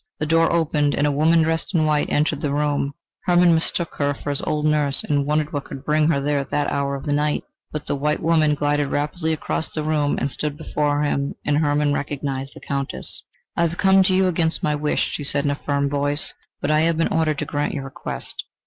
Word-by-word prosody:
The 155 Hz, -, -2 dB
door 165 Hz, +1 st, +3 dB
opened, 150 Hz, -3 st, +1 dB
and 145 Hz, -, +1 dB
a 145 Hz, -, +2 dB
woman 160 Hz, +3 st, +4 dB
dressed 165 Hz, +3 st, -1 dB
in 155 Hz, -2 st, +3 dB
white, 150 Hz, -1 st, +1 dB
entered 150 Hz, 0 st, +1 dB
the 145 Hz, -, -1 dB
room. 145 Hz, -1 st, 0 dB, 0.3 s
Hermann 175 Hz, -1 st, +5 dB
mistook 165 Hz, +1 st, -1 dB
her 145 Hz, -1 st, +1 dB
for 145 Hz, -, -4 dB
his 140 Hz, -, 0 dB
old 150 Hz, 0 st, -1 dB
nurse, 150 Hz, -2 st, +2 dB
and 145 Hz, -1 st, 0 dB
wondered 150 Hz, 0 st, 0 dB
what 145 Hz, -1 st, -3 dB
could 135 Hz, +1 st, -9 dB
bring 155 Hz, 0 st, +3 dB
her 155 Hz, -4 st, +2 dB
there 145 Hz, +1 st, 0 dB
at 140 Hz, -, -5 dB
that 145 Hz, 0 st, 0 dB
hour 140 Hz, 0 st, -1 dB
of 135 Hz, -, -7 dB
the 145 Hz, -, 0 dB
night. 150 Hz, +1 st, 0 dB, 0.3 s
But 150 Hz, -1 st, -5 dB
the -, -, -1 dB
white 150 Hz, +2 st, 0 dB
woman 155 Hz, -2 st, +3 dB
glided 145 Hz, 0 st, +1 dB
rapidly 160 Hz, +4 st, -1 dB
across 160 Hz, 0 st, -2 dB
the 155 Hz, -, -2 dB
room 150 Hz, -2 st, +1 dB
and 135 Hz, +2 st, -1 dB
stood 150 Hz, +1 st, -3 dB
before 150 Hz, -2 st, 0 dB
him 140 Hz, -1 st, -1 dB
and 145 Hz, +1 st, +2 dB
Hermann 145 Hz, -1 st, +2 dB
recognised 140 Hz, -1 st, -3 dB
the -, -, -11 dB
Countess! 140 Hz, -1 st, -3 dB, 0.3 s
"I -, -, 0 dB
have 170 Hz, +1 st, -6 dB
come 195 Hz, 0 st, +5 dB
to 190 Hz, 0 st, +3 dB
you 190 Hz, 0 st, +4 dB
against 165 Hz, -2 st, 0 dB
my 150 Hz, -, +2 dB
wish," 150 Hz, 0 st, 0 dB
she 145 Hz, -, -4 dB
said 140 Hz, 0 st, 0 dB
in 145 Hz, -, +2 dB
a -, -, -1 dB
firm 140 Hz, -1 st, +1 dB
voice: 145 Hz, +1 st, -1 dB, 0.3 s
"but 145 Hz, -, 0 dB
I 155 Hz, -, +4 dB
have 165 Hz, 0 st, +2 dB
been 165 Hz, -, +2 dB
ordered 155 Hz, -2 st, +1 dB
to -, -, -2 dB
grant 145 Hz, +1 st, -2 dB
your 140 Hz, -, -3 dB
request. 135 Hz, -, -6 dB
150 Hz, 235 wpm, -22 LUFS, 145-155 Hz, 0.3 s, Hermann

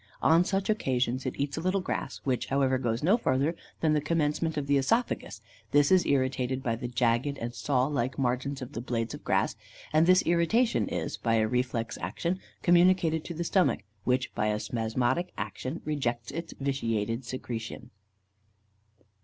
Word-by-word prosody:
On 165 Hz, +2 st, +6 dB
such 195 Hz, +1 st, -1 dB
occasions, 130 Hz, -, 0 dB
it -, -, -3 dB
eats 140 Hz, +2 st, -1 dB
a -, -, -2 dB
little 185 Hz, +3 st, +1 dB
grass, 185 Hz, -, -4 dB
which, 130 Hz, -3 st, -1 dB
however, 135 Hz, -1 st, +2 dB
goes 120 Hz, 0 st, -1 dB
no 195 Hz, +8 st, +5 dB
further 140 Hz, -, +1 dB, 0.3 s
than 155 Hz, -2 st, +3 dB
the 150 Hz, -, +2 dB
commencement 155 Hz, +1 st, 0 dB
of 145 Hz, -, -1 dB
the 140 Hz, 0 st, +2 dB
œsophagus; 135 Hz, -, 0 dB, 0.3 s
this 145 Hz, +5 st, +4 dB
is 185 Hz, -1 st, +5 dB
irritated 130 Hz, -1 st, 0 dB
by 115 Hz, -4 st, 0 dB
the 120 Hz, +2 st, -5 dB
jagged 120 Hz, +3 st, +1 dB
and 120 Hz, -1 st, -4 dB
saw 130 Hz, -1 st, +1 dB
like 135 Hz, -3 st, -1 dB
margins 135 Hz, +1 st, -1 dB
of 125 Hz, -, -8 dB
the 115 Hz, -, -5 dB
blades 115 Hz, -2 st, -2 dB
of -, -, -9 dB
grass, -, -, +1 dB, 0.4 s
and 155 Hz, +2 st, +4 dB
this 185 Hz, 0 st, +6 dB
irritation 175 Hz, +9 st, +2 dB
is, -, -, -3 dB
by 115 Hz, -1 st, +1 dB
a 110 Hz, -1 st, +3 dB
reflex 125 Hz, -1 st, -1 dB
action, 180 Hz, +2 st, -2 dB, 0.2 s
communicated 175 Hz, -2 st, +4 dB
to 170 Hz, -, -6 dB
the 170 Hz, -, -2 dB
stomach, 180 Hz, -, +2 dB, 0.2 s
which, 125 Hz, +1 st, 0 dB
by 105 Hz, -, 0 dB
a 105 Hz, 0 st, 0 dB
spasmodic 120 Hz, +9 st, -1 dB
action, 125 Hz, -, -4 dB
rejects 120 Hz, -6 st, -2 dB
its 165 Hz, +3 st, -5 dB
vitiated 115 Hz, -4 st, -1 dB
secretion. 120 Hz, 0 st, -6 dB
135 Hz, 170 wpm, -29 LUFS, 120-165 Hz, 0.4 s, On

